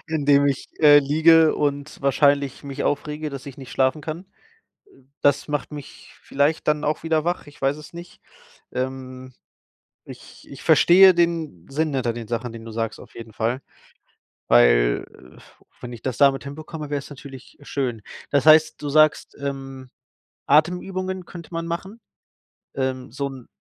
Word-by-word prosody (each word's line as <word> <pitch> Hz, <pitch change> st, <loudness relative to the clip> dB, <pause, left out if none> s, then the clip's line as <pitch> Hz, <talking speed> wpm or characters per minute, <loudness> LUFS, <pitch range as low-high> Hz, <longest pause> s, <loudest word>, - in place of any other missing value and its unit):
indem 145 Hz, -2 st, +3 dB
ich, 140 Hz, -1 st, -2 dB
äh, 145 Hz, -1 st, +8 dB
liege 160 Hz, +3 st, +4 dB
und 145 Hz, 0 st, -3 dB
wahrscheinlich 140 Hz, 0 st, +2 dB
mich 140 Hz, 0 st, -5 dB
aufrege, 150 Hz, +1 st, -2 dB
dass 135 Hz, -2 st, -8 dB
ich 140 Hz, 0 st, -10 dB
nicht 130 Hz, -2 st, -10 dB
schlafen 130 Hz, +3 st, +1 dB
kann. 160 Hz, +4 st, -6 dB, 0.6 s
Äh, 135 Hz, -, -23 dB, 0.2 s
das 145 Hz, +1 st, +2 dB
macht 150 Hz, 0 st, -3 dB
mich 145 Hz, -2 st, -11 dB
vielleicht 145 Hz, +3 st, 0 dB
dann 150 Hz, 0 st, +1 dB
auch 150 Hz, +1 st, -1 dB
wieder 160 Hz, -1 st, +1 dB
wach, 175 Hz, -3 st, -3 dB
ich 145 Hz, -, -16 dB
weiß 135 Hz, +2 st, +1 dB
es 150 Hz, +2 st, -13 dB
nicht. 175 Hz, +1 st, -11 dB, 0.5 s
Ähm, 130 Hz, 0 st, -5 dB, 0.7 s
ich -, -, -14 dB
ich -, -, -11 dB
verstehe 185 Hz, +2 st, +7 dB
den 165 Hz, -, -1 dB
Sinn 155 Hz, +1 st, -1 dB
hinter 125 Hz, -3 st, 0 dB
den 115 Hz, -1 st, -8 dB
Sachen, 120 Hz, +1 st, -3 dB
den 115 Hz, -1 st, -10 dB
du 115 Hz, -, -8 dB
sagst 115 Hz, 0 st, -4 dB
auf -, -, -15 dB
jeden 115 Hz, -1 st, -10 dB
Fall, 120 Hz, +5 st, -2 dB, 0.9 s
weil, -, -, +4 dB
äh, 65 Hz, -, -17 dB, 0.4 s
wenn 125 Hz, 0 st, -8 dB
ich 115 Hz, -, -10 dB
das 130 Hz, -3 st, -3 dB
damit 140 Hz, -1 st, +4 dB
hinbekomme, 155 Hz, +1 st, -8 dB
wäre 145 Hz, -, -1 dB
es 140 Hz, -, -11 dB
natürlich 135 Hz, -2 st, -12 dB
schön. 125 Hz, -6 st, -3 dB, 0.3 s
Das 140 Hz, +1 st, +1 dB
heißt, 155 Hz, -1 st, +5 dB
du 145 Hz, -, -3 dB
sagst, 155 Hz, +1 st, +2 dB
ähm: 135 Hz, -2 st, -6 dB, 0.6 s
„Atemübungen 180 Hz, +4 st, 0 dB
könnte 170 Hz, -3 st, -11 dB
man 165 Hz, 0 st, -4 dB
machen.“ 190 Hz, +7 st, -6 dB, 0.7 s
Ähm, 130 Hz, -2 st, -3 dB
so 140 Hz, +1 st, -3 dB
'n 130 Hz, -3 st, -11 dB
140 Hz, 165 wpm, -22 LUFS, 130-155 Hz, 0.9 s, äh